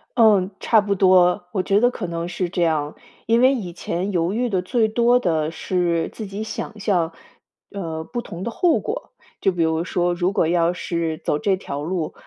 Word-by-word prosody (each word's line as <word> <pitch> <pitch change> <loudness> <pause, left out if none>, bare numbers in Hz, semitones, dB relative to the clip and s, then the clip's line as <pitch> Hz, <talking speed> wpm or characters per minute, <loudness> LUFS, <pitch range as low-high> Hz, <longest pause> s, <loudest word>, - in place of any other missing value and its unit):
嗯， 210 -6 +5
差 225 - +4
不 200 -1 -1
多。 180 -2 +4
我 190 - 0
觉 200 +2 +3
得 245 +1 +4
可 190 -7 -5
能 170 0 -4
是 180 0 -3
这 175 - -2
样， 155 -3 0 0.3
因 230 +1 +3
为 260 +2 +6
以 185 -9 -4
前 180 +3 -3
犹 175 0 0
豫 245 +2 0
的 190 -4 0
最 220 +4 +1
多 240 +3 +3
的 160 -6 0
是 170 -1 -1
自 220 - -6
己 200 +2 -5
想 220 0 -6
象， 180 -5 +1 0.6
呃， 165 -5 -5
不 240 +7 -5
同 180 -5 -8
的 235 - -3
后 340 +6 +2
果。 - - -5 0.3
就 195 - +3
比 175 - -2
如 160 0 +1
说， 175 0 0
如 175 +2 0
果 170 - +1
要 170 +1 +2
是 170 -3 -2
走 150 - 0
这 195 +4 +1
条 145 -5 -5
路， 165 -1 -3
180 Hz, 220 characters per minute, -22 LUFS, 170-210 Hz, 0.6 s, 为